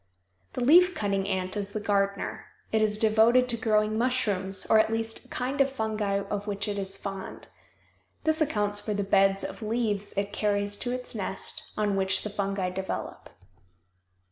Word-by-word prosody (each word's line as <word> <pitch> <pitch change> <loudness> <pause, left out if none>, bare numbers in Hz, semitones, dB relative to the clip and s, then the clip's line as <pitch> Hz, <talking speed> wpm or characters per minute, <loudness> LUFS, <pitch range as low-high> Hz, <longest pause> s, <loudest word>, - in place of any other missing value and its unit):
The - - -3
leaf 360 +6 +6
cutting 195 -2 -1
ant 185 -1 -2
is 200 -1 -3
the 215 - -2
gardener. 200 -1 -1 0.3
It 220 - +2
is 210 -1 +2
devoted 225 +3 +4
to 235 - +1
growing 215 -1 +1
mushrooms 205 -6 0
or 220 - +6
at 220 - +3
least 225 0 -3
a - - -17
kind 265 +3 -2
of 275 0 +3
fungi 215 -5 -1
of 205 +1 -4
which 200 0 -2
it 205 -1 -2
is 195 0 -3
fond. 195 -1 -7 0.7
This 315 0 +2
accounts 210 -8 +2
for 210 0 -3
the 200 - 0
beds 195 0 +3
of - - -6
leaves 215 -2 -1
it 200 0 -1
carries 205 -1 0
to 245 - -2
its 250 0 -5
nest, 195 -3 -4
on 210 -2 +1
which 190 -1 +1
the 210 - -4
fungi 195 -2 -2
develop. 190 +1 -5
210 Hz, 175 wpm, -27 LUFS, 200-225 Hz, 0.7 s, leaf